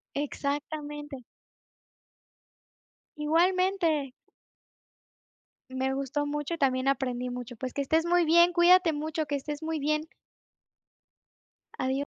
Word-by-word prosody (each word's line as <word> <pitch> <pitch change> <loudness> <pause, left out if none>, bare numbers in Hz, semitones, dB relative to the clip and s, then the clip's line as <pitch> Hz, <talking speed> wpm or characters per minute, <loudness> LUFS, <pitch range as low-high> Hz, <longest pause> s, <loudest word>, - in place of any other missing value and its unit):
Exactamente. 290 -1 -4 1.9
Igualmente. 335 -2 +1 1.6
Me 265 +1 -1
gustó 275 +2 -2
mucho 295 +2 -3
y 335 - -6
también 260 -1 +1
aprendí 250 -2 -1
mucho. 245 0 -6
Pues, 255 +2 -5
que - - -3
estés 315 +4 +1
muy 350 0 +3
bien, 340 +2 +5
cuídate 350 0 +5
mucho, 310 +1 -3
que 285 0 -1
estés 295 +2 -6
muy 320 0 -2
bien. 305 +2 -1 1.7
Adiós. 265 +2 -1
295 Hz, 105 wpm, -28 LUFS, 270-325 Hz, 1.9 s, bien